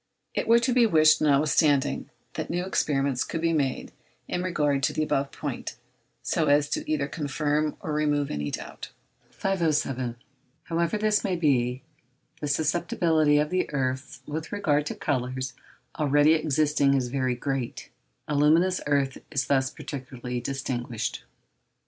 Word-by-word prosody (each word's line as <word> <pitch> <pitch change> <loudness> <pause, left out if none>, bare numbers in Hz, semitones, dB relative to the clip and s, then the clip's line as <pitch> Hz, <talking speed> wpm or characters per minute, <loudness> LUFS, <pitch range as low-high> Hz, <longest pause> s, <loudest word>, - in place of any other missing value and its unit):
It - - -2
were 230 +1 +7
to 240 +2 +1
be 240 -2 +5
wished, 155 -5 +5
notwithstanding, 145 -1 +2 0.2
that - - -4
new 175 +2 -1
experiments 140 -7 0
could 165 - -4
be 165 0 +1
made 140 -4 -1 0.4
in 180 - -2
regard 150 -6 0
to 150 +2 +1
the 155 - 0
above 140 -2 0
point, 140 -7 -5 0.5
so 160 -3 0
as 145 0 +3
either 155 -2 0
to - - -6
confirm 150 0 -1
or 155 - -3
remove 150 -1 +1
any 75 0 -2
doubt. - - -7 0.4
507. 150 -10 -1 0.5
However 170 +3 0
this 210 0 +2
may 190 -2 0
be, 130 -6 +1 0.6
the 150 - -3
susceptibility 160 0 +2
of 150 +1 +1
the 185 0 0
earths 130 -1 -3
with 155 +2 -5
regard 150 -8 +1
to - - -4
colours 130 -2 -2 0.5
already 145 +1 +4
existing 150 -2 +2
is 125 -2 0
very 130 -1 0
great; 135 -1 -4 0.4
aluminous 155 +5 +3
earth 140 -2 +1
is 135 -3 -1
thus 130 -1 +2
particularly 125 -3 -6
distinguished. 125 - -3
145 Hz, 145 wpm, -26 LUFS, 135-160 Hz, 0.6 s, were